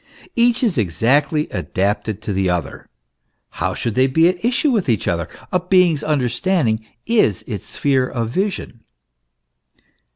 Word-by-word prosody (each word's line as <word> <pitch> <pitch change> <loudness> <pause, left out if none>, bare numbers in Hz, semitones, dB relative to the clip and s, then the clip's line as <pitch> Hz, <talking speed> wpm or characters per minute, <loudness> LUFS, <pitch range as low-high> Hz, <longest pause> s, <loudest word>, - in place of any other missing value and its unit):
Each 240 +1 +3
is 205 - +2
exactly 140 - +1
adapted 105 +1 -2
to 105 - -2
the 95 -1 +1
other; 85 -6 -3 0.6
how - - -2
should 115 - -2
they 130 +4 +3
he 160 +5 +4
at 180 +1 -4
issue 250 +5 +2
with 210 - 0
each 110 -4 0
other? 85 -1 -1 0.2
A 180 - +2
being's 180 -4 +3
understanding 125 -3 0 0.2
is 210 - +2
its 105 -6 -6
sphere 135 -3 0
of 115 -2 -3
vision. 190 - -3
135 Hz, 140 wpm, -19 LUFS, 110-180 Hz, 0.6 s, he